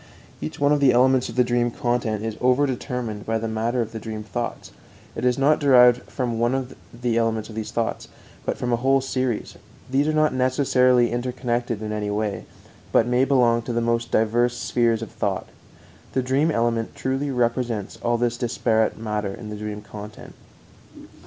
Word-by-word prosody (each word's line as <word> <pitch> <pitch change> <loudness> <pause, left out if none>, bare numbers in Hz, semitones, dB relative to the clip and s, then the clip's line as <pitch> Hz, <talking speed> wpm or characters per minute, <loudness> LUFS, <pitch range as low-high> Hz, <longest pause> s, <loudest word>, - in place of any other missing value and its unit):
Each 75 - -5
one 145 0 +3
of 150 - +3
the 140 -2 +5
elements 130 +1 +3
of 115 - -8
the 125 - +4
dream 120 0 +1
content 115 -3 -1
is 110 - -2
overdetermined 125 -4 0
by 115 0 -1
the 115 0 -3
matter 115 +3 -1
of 110 - -9
the 115 - -6
dream 110 -1 -6
thoughts; 120 +2 -5 0.4
it - - -5
is 125 -1 +2
not 145 +3 +3
derived 125 -3 +6
from 120 -4 -2
one 125 +2 -1 0.3
element 115 -2 0
of - - -9
these 110 0 -4
thoughts, 115 -1 -2 0.4
but - - -2
from 125 -1 -1
a - - +3
whole 135 +3 +3
series. 130 -3 -2 0.3
These 140 +3 +2
are - - +2
not 155 -2 +2
necessarily 125 -1 +3
interconnected 120 -2 -2
in 105 - -4
any 105 -1 -2
way, 105 0 -2 0.5
but - - +4
may 125 +2 +2
belong 120 -4 +3
to 120 +1 -5
the 120 - +1
most 115 0 0
diverse 120 +2 +2
spheres 115 -2 +1
of - - -8
thought. 105 -4 -2 0.7
The 130 - +1
dream 135 +5 +2
element 115 -4 0
truly 135 +2 -2
represents 120 -4 -1
all 120 0 +1
this 120 0 0
disparate 115 -2 +1
matter 105 -3 -3
in 105 -2 -8
the - - -5
dream 105 0 -6
content. 105 0 -10
120 Hz, 180 wpm, -23 LUFS, 110-125 Hz, 0.7 s, derived